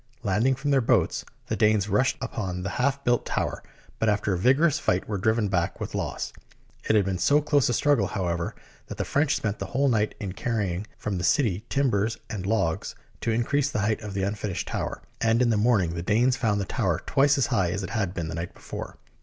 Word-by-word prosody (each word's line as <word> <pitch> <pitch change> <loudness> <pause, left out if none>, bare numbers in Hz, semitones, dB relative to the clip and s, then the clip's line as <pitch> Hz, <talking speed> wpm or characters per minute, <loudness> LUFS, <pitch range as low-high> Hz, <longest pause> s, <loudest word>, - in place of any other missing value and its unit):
Landing 130 +5 +2
from 145 +2 -2
their 135 -1 +4
boats, 115 - +2 0.2
the - - -2
Danes 105 -1 +3
rushed 130 +4 +2
upon 90 -4 -4
the 100 - -2
half 140 +1 +1
built 120 0 +2
tower, - - -2 0.4
but 110 - +2
after 105 -1 +1
a - - 0
vigorous 135 - +4
fight, 90 - 0
were 105 -2 -2
driven 110 +2 +2
back 85 -3 -1
with - - -5
loss. - - -3 0.6
It 110 - +4
had 105 -3 +4
been 95 -2 -2
so 145 +7 +4
close 145 -3 +2
a - - +1
struggle, 145 -1 +3
however, 85 -3 -2 0.3
that - - -7
the - - -1
French 150 +1 +2
spent 105 -1 -2
the - - -4
whole 140 +2 +1
night 110 -3 +1
in 100 -3 -4
carrying 105 -4 -2
from 100 -4 -3
the - - -3
city 105 - +2
timbers 115 -6 +1
and 95 -3 -4
logs 100 -7 0 0.2
to - - -2
increase 130 +5 +1
the 105 - -1
height 110 +1 0
of 105 -3 -6
the 95 - 0
unfinished 100 -1 -2
tower, - - -3 0.2
and 115 +1 +3
in 125 -2 +3
the - - +2
morning 105 -6 +2
the 85 - -3
Danes 120 +7 +2
found 110 -6 0
the 100 - -1
tower - - -1
twice 145 +1 +3
as 135 - +3
high 100 -7 +1
as 90 +3 -2
it 95 - -5
had 100 -5 -1
been 85 -2 -3
the 80 - -5
night 85 +1 -5
before. - - -8
110 Hz, 225 wpm, -26 LUFS, 95-125 Hz, 0.6 s, their